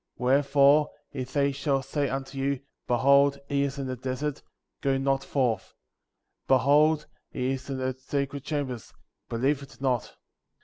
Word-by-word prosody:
25. -, -, -15 dB
Wherefore, 140 Hz, +2 st, +5 dB, 0.2 s
if 130 Hz, -2 st, -5 dB
they 140 Hz, 0 st, +2 dB
shall 135 Hz, -1 st, 0 dB
say 140 Hz, 0 st, -1 dB
unto 135 Hz, +1 st, -4 dB
you: 135 Hz, 0 st, 0 dB, 0.3 s
Behold, 140 Hz, +3 st, +4 dB
he 140 Hz, 0 st, +1 dB
is 140 Hz, 0 st, -1 dB
in 140 Hz, -, -3 dB
the 130 Hz, -1 st, -3 dB
desert; 135 Hz, +3 st, -3 dB, 0.4 s
go 135 Hz, -1 st, +2 dB
not 135 Hz, 0 st, +1 dB
forth; 120 Hz, -8 st, -1 dB, 0.7 s
Behold, 150 Hz, +4 st, +4 dB, 0.2 s
he 130 Hz, 0 st, -2 dB
is 135 Hz, +1 st, -5 dB
in 135 Hz, -, -2 dB
the 130 Hz, 0 st, -1 dB
secret 140 Hz, +1 st, -3 dB
chambers; 135 Hz, -7 st, -4 dB, 0.4 s
believe 135 Hz, +5 st, +1 dB
it 140 Hz, 0 st, -13 dB
not; 130 Hz, -3 st, +2 dB
26. -, -, -17 dB
135 Hz, 160 wpm, -27 LUFS, 130-140 Hz, 0.7 s, Wherefore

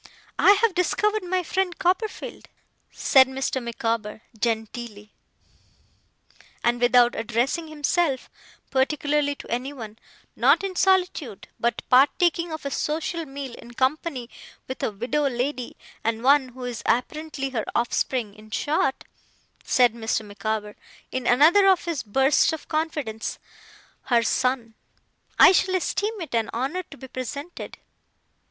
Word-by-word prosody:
'I 400 Hz, -, +8 dB
have 420 Hz, 0 st, +2 dB
discovered 420 Hz, +4 st, +1 dB
my 365 Hz, 0 st, -1 dB
friend 365 Hz, +1 st, -1 dB
Copperfield,' 375 Hz, +5 st, -2 dB, 0.4 s
said 265 Hz, -1 st, +5 dB
Mr. 265 Hz, 0 st, -2 dB
Micawber 225 Hz, -2 st, -3 dB
genteelly, 220 Hz, -1 st, -4 dB, 1.5 s
and 240 Hz, 0 st, +1 dB
without 245 Hz, 0 st, +5 dB
addressing 240 Hz, +9 st, -1 dB
himself 305 Hz, -1 st, 0 dB, 0.4 s
particularly 285 Hz, +1 st, +1 dB
to -, -, -11 dB
anyone, 240 Hz, -3 st, -5 dB, 0.4 s
'not -, -, +4 dB
in 385 Hz, -1 st, -3 dB
solitude, 360 Hz, -, +1 dB
but 235 Hz, -1 st, -1 dB
partaking 335 Hz, +6 st, +3 dB
of 315 Hz, -2 st, -6 dB
a 280 Hz, -, -2 dB
social 320 Hz, +3 st, -2 dB
meal 270 Hz, -2 st, -7 dB
in 240 Hz, 0 st, -12 dB
company 265 Hz, -1 st, -1 dB, 0.4 s
with 260 Hz, -, -6 dB
a -, -, 0 dB
widow 255 Hz, +8 st, -1 dB
lady, 250 Hz, 0 st, -3 dB, 0.3 s
and 225 Hz, +1 st, -1 dB
one 270 Hz, 0 st, +4 dB
who 255 Hz, +1 st, -10 dB
is 245 Hz, -3 st, -4 dB
apparently 275 Hz, +3 st, -1 dB
her 225 Hz, -4 st, -2 dB
offspring 240 Hz, -2 st, 0 dB
in 215 Hz, +1 st, -16 dB
short,' 270 Hz, +3 st, 0 dB, 0.6 s
said 245 Hz, -3 st, +4 dB
Mr. 225 Hz, -1 st, -2 dB
Micawber, 210 Hz, +1 st, -4 dB, 0.4 s
in 255 Hz, -2 st, -3 dB
another 320 Hz, +11 st, +6 dB
of 380 Hz, -2 st, +4 dB
his 335 Hz, -5 st, -2 dB
bursts 265 Hz, +6 st, +3 dB
of 320 Hz, -, -6 dB
confidence, 300 Hz, -9 st, -3 dB, 0.7 s
'her 235 Hz, -2 st, +3 dB
son. 245 Hz, 0 st, 0 dB, 0.6 s
I -, -, +9 dB
shall 375 Hz, 0 st, +2 dB
esteem 415 Hz, +4 st, -1 dB
it 325 Hz, -, -7 dB
an 225 Hz, -2 st, +1 dB
honour 275 Hz, +10 st, -1 dB
to 285 Hz, -, -12 dB
be 265 Hz, -, -10 dB
presented. 280 Hz, +6 st, -7 dB
265 Hz, 130 wpm, -24 LUFS, 235-315 Hz, 1.5 s, I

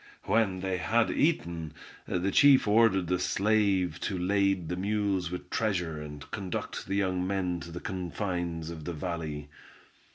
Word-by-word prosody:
When 100 Hz, -5 st, +1 dB
they 95 Hz, -1 st, -1 dB
had 115 Hz, +5 st, +2 dB
eaten, 85 Hz, -, 0 dB, 0.3 s
the 90 Hz, +3 st, 0 dB
chief 140 Hz, -2 st, +6 dB
ordered 105 Hz, -3 st, +4 dB
the 90 Hz, +1 st, 0 dB
slave 95 Hz, -4 st, +1 dB
to 95 Hz, -, -2 dB
lade 95 Hz, -1 st, +1 dB
the 90 Hz, -, -2 dB
mules 100 Hz, -2 st, 0 dB
with 90 Hz, 0 st, -7 dB
treasure 90 Hz, -8 st, -1 dB
and 75 Hz, -1 st, -9 dB
conduct 95 Hz, -3 st, -4 dB
the 95 Hz, -, -1 dB
young 95 Hz, -2 st, 0 dB
men 90 Hz, -3 st, -1 dB
to 85 Hz, -, -9 dB
the 85 Hz, +1 st, -6 dB
confines 85 Hz, -3 st, -3 dB
of 80 Hz, -2 st, -8 dB
the 85 Hz, -, -3 dB
valley. 75 Hz, -2 st, -4 dB
90 Hz, 155 wpm, -29 LUFS, 85-100 Hz, 0.3 s, chief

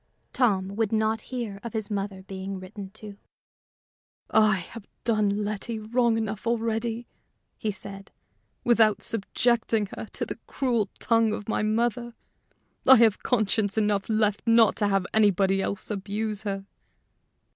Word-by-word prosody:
Tom 195 Hz, -7 st, +2 dB
would 225 Hz, -3 st, +1 dB
not 220 Hz, 0 st, +1 dB
hear 235 Hz, -6 st, -4 dB
of 235 Hz, -, -6 dB
his 220 Hz, -1 st, -2 dB
mother 195 Hz, -1 st, -3 dB
being 190 Hz, 0 st, -6 dB
written 195 Hz, +1 st, -9 dB
to. 210 Hz, 0 st, -10 dB, 1.1 s
"I 215 Hz, -2 st, +5 dB
have 195 Hz, +4 st, -7 dB, 0.2 s
done 210 Hz, -2 st, +1 dB
Letty 215 Hz, +2 st, -3 dB
wrong 230 Hz, +1 st, +1 dB
enough 220 Hz, 0 st, -3 dB
already," 230 Hz, 0 st, -1 dB, 0.5 s
he 220 Hz, -, -3 dB
said, 195 Hz, -1 st, -6 dB, 0.5 s
"without 220 Hz, -4 st, +4 dB
subjecting 225 Hz, -1 st, 0 dB
her -, -, -6 dB
to -, -, -3 dB
the -, -, -7 dB
cruel 235 Hz, -7 st, 0 dB
tongue 225 Hz, -2 st, +2 dB
of 210 Hz, -, -5 dB
my 220 Hz, -, 0 dB
mother. 235 Hz, +2 st, 0 dB, 0.7 s
I 265 Hz, -, +11 dB
have 225 Hz, -4 st, +4 dB
conscience 215 Hz, -3 st, +1 dB
enough 210 Hz, -2 st, +1 dB
left 215 Hz, -2 st, +1 dB
not 230 Hz, -2 st, +5 dB
to 205 Hz, -, +2 dB
have 195 Hz, -2 st, +1 dB
anybody 195 Hz, -2 st, +3 dB
else 200 Hz, +2 st, -3 dB
abuse 210 Hz, +1 st, -3 dB
her." 195 Hz, -2 st, -4 dB
215 Hz, 140 wpm, -26 LUFS, 200-230 Hz, 1.1 s, I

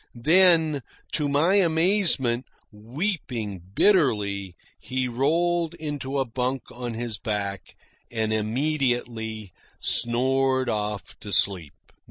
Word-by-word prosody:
Then, 160 Hz, +1 st, +4 dB, 0.3 s
to 150 Hz, -2 st, +2 dB
my 160 Hz, +8 st, +3 dB
amazement, 165 Hz, -, +2 dB, 0.2 s
weeping 115 Hz, -, -4 dB
bitterly, 105 Hz, -, +2 dB, 0.2 s
he 130 Hz, 0 st, -2 dB
rolled 165 Hz, +7 st, 0 dB
into 145 Hz, -4 st, -4 dB
a 135 Hz, -, +1 dB
bunk 125 Hz, +2 st, -3 dB
on 120 Hz, -2 st, -5 dB
his 115 Hz, -2 st, -4 dB
back 100 Hz, -4 st, -4 dB, 0.3 s
and 110 Hz, -2 st, -1 dB
immediately 115 Hz, -3 st, -1 dB, 0.3 s
snored 130 Hz, +2 st, +1 dB
off 105 Hz, -2 st, -4 dB
to 105 Hz, -, -8 dB
sleep. 90 Hz, -6 st, +3 dB
125 Hz, 100 wpm, -25 LUFS, 110-155 Hz, 0.3 s, Then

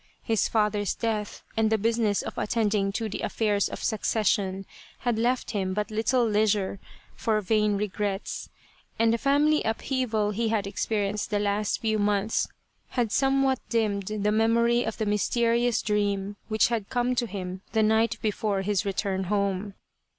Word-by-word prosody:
His 225 Hz, -3 st, +1 dB
father's 210 Hz, -2 st, +1 dB
death, 215 Hz, -3 st, -3 dB
and 220 Hz, -1 st, +2 dB
the 220 Hz, -, +4 dB
business 225 Hz, -1 st, +1 dB
of -, -, -6 dB
attending 210 Hz, -3 st, 0 dB
to 225 Hz, +1 st, -2 dB
the 210 Hz, -, -5 dB
affairs 205 Hz, -3 st, 0 dB
of -, -, -7 dB
succession, 200 Hz, -3 st, 0 dB, 0.4 s
had 240 Hz, -3 st, 0 dB
left 245 Hz, +2 st, 0 dB
him 190 Hz, -3 st, -1 dB
but 210 Hz, +1 st, -2 dB
little 235 Hz, +3 st, +2 dB
leisure 210 Hz, -2 st, +1 dB, 0.4 s
for 220 Hz, -2 st, +1 dB
vain 210 Hz, 0 st, +1 dB
regrets, 205 Hz, -1 st, -3 dB, 0.5 s
and 230 Hz, 0 st, +3 dB
the 230 Hz, -, 0 dB
family 290 Hz, +3 st, +3 dB
upheaval 225 Hz, -2 st, -1 dB
he 225 Hz, +2 st, -1 dB
had 215 Hz, -3 st, 0 dB
experienced 205 Hz, 0 st, -1 dB
the 210 Hz, -, 0 dB
last 205 Hz, 0 st, 0 dB
few 220 Hz, -1 st, +1 dB
months 205 Hz, +1 st, +1 dB, 0.4 s
had 240 Hz, -4 st, -1 dB
some 270 Hz, 0 st, +2 dB
what 265 Hz, -1 st, +2 dB
dimmed 205 Hz, -4 st, 0 dB
the 210 Hz, -1 st, 0 dB
memory 235 Hz, +2 st, +3 dB
of 225 Hz, -, -4 dB
the 220 Hz, -, -1 dB
mysterious 235 Hz, +3 st, +1 dB
dream, 205 Hz, -1 st, 0 dB
which 215 Hz, 0 st, +3 dB
had 225 Hz, -4 st, -2 dB
come 245 Hz, 0 st, +1 dB
to 245 Hz, -1 st, 0 dB
him 185 Hz, -2 st, -6 dB
the 220 Hz, -, +3 dB
night 220 Hz, +1 st, +2 dB
before 210 Hz, -2 st, 0 dB
his 205 Hz, -1 st, 0 dB
return 195 Hz, -1 st, -1 dB
home. 200 Hz, 0 st, -1 dB
215 Hz, 160 wpm, -27 LUFS, 205-230 Hz, 0.5 s, the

